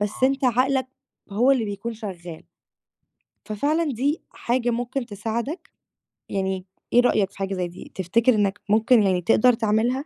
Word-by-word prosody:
بس 205 0 -1
أنت 270 +1 +1
عقلك 260 +2 +2 0.4
هو 235 +7 +3
اللي 245 -4 +1
بيكون 205 +3 -5
شغّال، 180 -7 -8 1.0
ففعلًا 290 +10 0
دي 285 +7 -1
حاجة 240 0 -1
ممكن 245 +2 -2
تساعدك، 230 - -4 0.6
يعني 190 -1 -2 0.3
إيه 245 - +7
رأيك 205 -5 +2
في - - -19
حاجة 195 0 -2
زي 180 -1 -2
دي، 175 - -12
تفتكر 225 +7 +2
إنّك 205 -1 0
ممكن 220 +1 +4
يعني 185 -2 +2
تقدر 235 +6 +4
تعملها؟ 230 +5 0
225 Hz, 150 wpm, -23 LUFS, 200-255 Hz, 1.0 s, إيه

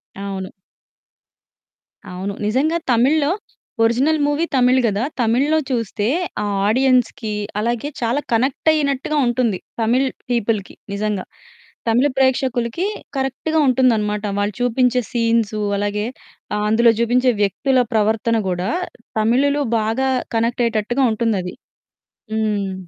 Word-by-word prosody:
అవును. 195 -1 -5 1.6
అవును. 185 +2 -5
నిజంగా 295 +9 +1
తమిళ్లో 285 +6 +3 0.5
ఒరిజినల్ 270 +7 +2
మూవీ 295 +3 +1
తమిళ్ 255 0 +4
గదా! 210 +1 0 0.2
తమిళ్లో 265 +7 +2
చూస్తే 225 -3 -1 0.4
ఆ - - -1 0.2
ఆడియన్స్‌కి 250 -2 +2 0.3
అలాగే 235 +5 -1
చాలా 240 +5 0
కనెక్ట్ 260 +6 +1
అయినట్టుగా 285 0 0
ఉంటుంది. 240 -5 +1 0.2
తమిళ్ 250 +4 +2 0.2
పీపుల్‌కి 225 -4 -1 0.2
నిజంగా 205 -2 -2 0.6
తమిళ 245 +5 +3
ప్రేక్షకులకి 260 +3 +1 0.3
కరెక్ట్‌గా 270 +4 -1
ఉంటుందనమాట. 220 -5 +2 0.2
వాళ్ళు 205 +1 0
చూపించే 250 +1 +2
సీన్సు. 230 -3 +1 0.2
అలాగే 205 +1 -1 0.5
ఆహ్, 210 0 -1
అందులో 230 +1 +5
చూపించే 250 +2 +3
వ్యక్తుల 255 +7 +2
ప్రవర్తన 220 +1 +2
గూడా 180 +2 -1 0.5
తమిళులు 280 +6 +2 0.2
బాగా 225 +5 0 0.3
కనెక్ట్ 235 +2 +1
అయ్యేటట్టుగా 230 +4 0
ఉంటుందది. 210 -5 -1 0.8
హ్మ్. 210 -3 -1
235 Hz, 105 wpm, -20 LUFS, 215-260 Hz, 1.6 s, అందులో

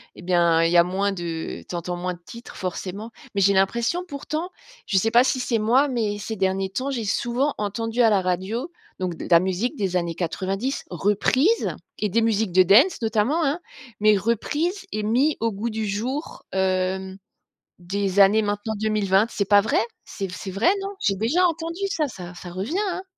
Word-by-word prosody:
Eh - - -11
bien, 170 -2 +3
il 165 - +2
y 175 - +4
a 170 - +8
moins 195 +3 -1
de 170 -3 -5
tu - - -4
entends 175 +1 -3
moins 180 +1 -3
de 175 - -19
titres, 235 0 -11
forcément. 190 +4 -5 0.2
Mais 200 - +2
j'ai 200 +1 +5
l'impression, 235 - +1
pourtant 310 +3 -4 0.4
je 195 - +1
sais 225 +4 +2
pas 240 +2 +6
si 260 -1 0
c'est 235 -3 0
moi, 250 +7 +3
mais 215 -5 -1
ces 220 +2 -5
derniers 190 0 0
temps, 260 +6 -2
j'ai 235 -4 -2
souvent 245 +7 0
entendu 225 +3 -1
à 230 - +6
la 200 -2 +3
radio, 190 - -2 0.3
donc, 180 -2 -2
de - - -7
la 170 -1 +7
musique 190 - -1
des 190 -3 -1
années 170 -2 -2
90 190 - -2
reprise 210 - +1 0.2
et 210 - 0
des 230 +5 +2
musiques 225 -3 +1
de 185 0 +7
dance, 240 - +5
notamment, 225 +9 +1
hein. 290 +5 0 0.4
Mais 215 0 +5
reprises 295 - -1
et 215 0 -2
mis 255 +8 +2
au 230 - +1
goût 215 +4 -3
du 220 0 -3
jour, 245 +10 -4
hem, 190 0 -1 0.6
des 195 +2 -1
années 200 +3 +6
maintenant 205 +1 -2
2020. 210 -2 +2
C'est 200 - -1
pas 205 -1 +7
vrai? 210 - +1 0.2
C'est 195 -2 -5
f - - -7
c'est 190 - -6
vrai, 210 - +3
non? 390 - -4
J'ai 195 -1 +1
déjà 270 - +2
entendu 330 +2 -4
ça. 315 -5 0
Ça 180 -9 -9
ça 175 0 -9
revient, 215 - -3
hein? 370 +2 -4
210 Hz, 200 wpm, -23 LUFS, 190-240 Hz, 0.6 s, a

